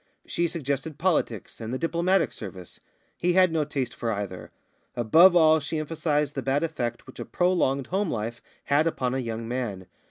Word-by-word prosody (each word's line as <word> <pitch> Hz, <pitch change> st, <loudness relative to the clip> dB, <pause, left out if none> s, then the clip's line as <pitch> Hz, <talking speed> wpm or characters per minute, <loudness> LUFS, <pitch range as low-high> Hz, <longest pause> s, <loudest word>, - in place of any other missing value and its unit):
She 170 Hz, -, 0 dB
suggested 150 Hz, -1 st, -3 dB
politics 150 Hz, -, -1 dB
and 110 Hz, 0 st, -5 dB
the 130 Hz, -, -1 dB
Diplomatic 170 Hz, +4 st, +1 dB
Service; 95 Hz, -5 st, -9 dB, 0.4 s
he 175 Hz, 0 st, +2 dB
had 185 Hz, -1 st, +5 dB
no 160 Hz, -2 st, +1 dB
taste 135 Hz, -4 st, -3 dB
for 115 Hz, -, -3 dB
either. 100 Hz, -3 st, -5 dB, 0.5 s
Above 165 Hz, -, +6 dB
all, 160 Hz, -2 st, +6 dB
she 155 Hz, +2 st, -4 dB
emphasised 150 Hz, -2 st, -1 dB
the 135 Hz, -, -3 dB
bad 135 Hz, +4 st, 0 dB
effect 120 Hz, -8 st, -3 dB
which 130 Hz, -, -13 dB
a -, -, -3 dB
prolonged 170 Hz, -7 st, +1 dB
homelife 120 Hz, -, -2 dB, 0.2 s
had 150 Hz, +3 st, +2 dB
upon 130 Hz, -6 st, -1 dB
a 135 Hz, -, -1 dB
young 115 Hz, -2 st, -4 dB
man. 115 Hz, -7 st, -3 dB
140 Hz, 170 wpm, -26 LUFS, 120-165 Hz, 0.5 s, Above